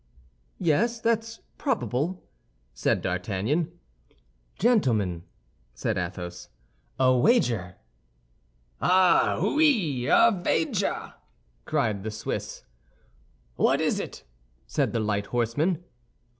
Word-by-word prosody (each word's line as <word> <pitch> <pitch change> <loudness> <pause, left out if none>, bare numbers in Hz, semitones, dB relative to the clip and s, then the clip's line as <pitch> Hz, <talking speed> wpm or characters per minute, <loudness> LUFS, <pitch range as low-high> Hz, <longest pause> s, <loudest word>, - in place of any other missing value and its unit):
"Yes, 220 +8 +1
that's 225 0 -1 0.2
probable," 185 - -1 0.5
said - - 0
D'Artagnan. 100 - -1 0.9
"Gentlemen," 110 - +1 0.5
said 110 - -1
Athos, 90 -1 -5 0.5
"a 130 -1 +4
wager!" 120 - +2 1.1
"Ah, 185 -1 +4
wooi, 205 - +2
a 230 - +6
vager!" 160 -2 -1 0.5
cried 105 -3 0
the 110 - -4
Swiss. 105 - -5 0.9
"What - - +3
is - - +1
it?" - - -7 0.4
said - - 0
the 115 - -1
light 105 -2 -1
horseman. 145 +9 0
130 Hz, 90 wpm, -26 LUFS, -, 1.1 s, a